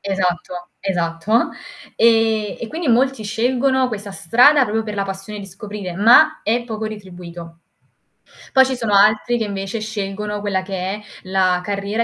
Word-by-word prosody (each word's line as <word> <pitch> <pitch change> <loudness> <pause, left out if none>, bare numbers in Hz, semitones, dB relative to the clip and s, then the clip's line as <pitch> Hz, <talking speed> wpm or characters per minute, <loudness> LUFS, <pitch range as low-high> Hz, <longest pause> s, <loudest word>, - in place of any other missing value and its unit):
Esatto, 180 -2 -2
esatto. 180 +3 0 0.5
E 225 -2 +2
e 230 - -5
quindi 320 0 -4
molti 255 0 +2
scelgono 255 +4 +1
questa 205 -3 -6
strada 250 - +4
proprio 220 -1 -1
per 210 -1 -5
la 200 - -1
passione 195 +2 -7
di 195 - -8
scoprire, 195 -2 -7
ma 245 - +5
è 235 +3 0
poco 220 -2 -5
retribuito. 175 -5 -9 0.9
Poi 265 0 +7
ci 260 0 -2
sono 225 -4 -2
altri 215 +4 +4
che 225 - -1
invece 195 +1 -4
scelgono 210 -1 -4
quella 195 -2 -1
che 195 +1 -9
è 190 +3 -3 0.2
la 185 -1 +1
carriera 205 +3 -2
210 Hz, 155 wpm, -19 LUFS, 195-230 Hz, 0.9 s, Poi